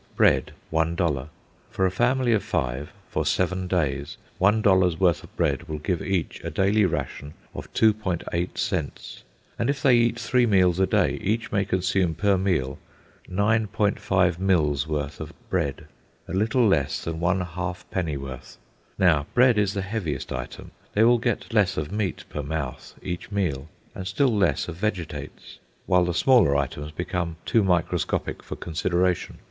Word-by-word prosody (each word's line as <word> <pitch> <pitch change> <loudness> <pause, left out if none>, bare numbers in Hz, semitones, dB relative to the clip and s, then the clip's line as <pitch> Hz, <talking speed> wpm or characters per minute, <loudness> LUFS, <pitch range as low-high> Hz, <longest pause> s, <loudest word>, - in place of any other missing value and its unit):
Bread, - - +3 0.2
$1: 80 -4 0 0.4
for 95 - 0
a 95 - +2
family 120 +4 +2
of 105 - +2
five, 65 +4 -2 0.2
for - - -1
seven 95 0 0
days, 75 -6 -1 0.2
one 105 +4 +3
dollar's 95 -4 +4
worth 85 -3 +2
of - - -16
bread - - 0
will 75 - -3
give 85 +3 -2
each 95 -4 -2
a 85 - -3
daily 100 +5 +2
ration 75 -2 -4 0.2
of - - -8
2.8 95 -5 0
cents; - - -3 0.4
and 115 - +1
if 140 -1 -1
they 130 -3 +6
eat 120 0 +2
three 120 +1 +2
meals 90 -4 +3
a 95 - +3
day, - - +1
each 110 +4 -1
may 100 -1 +2
consume 95 -2 0
per 100 +2 +2
meal 90 -9 0 0.5
9.5 100 -3 +1
mills' 75 -7 +2
worth 75 -2 -3
of - - -7 0.2
bread, 70 - -1 0.4
a - - -6
little 110 +5 +2
less 75 -9 +1
than 80 -1 -3
one 90 +2 +1
halfpennyworth. 85 -6 -5 0.4
Now 80 -7 +3
bread 125 -3 +5
is 100 -1 +1
the 100 - -1
heaviest 95 -9 -3
item. - - -7 0.2
They 105 - +4
will 120 +1 +5
get 120 0 -2
less 100 -4 +3
of 75 +1 -3
meat 105 -2 -2
per 75 - -5
mouth 70 -2 -5
each 90 +1 -5
meal, 80 -8 -1 0.2
and 95 - -6
still 115 +5 +2
less 100 -2 +1
of 85 -2 -6
vegetables; 95 -4 -5 0.3
while 90 -1 +3
the 85 -1 -2
smaller 110 - +5
items 70 +2 -2
become 90 +1 -3
too 115 - +3
microscopic 90 -3 0
for - - -7
consideration. 90 +2 -1
90 Hz, 160 wpm, -25 LUFS, 80-105 Hz, 0.5 s, they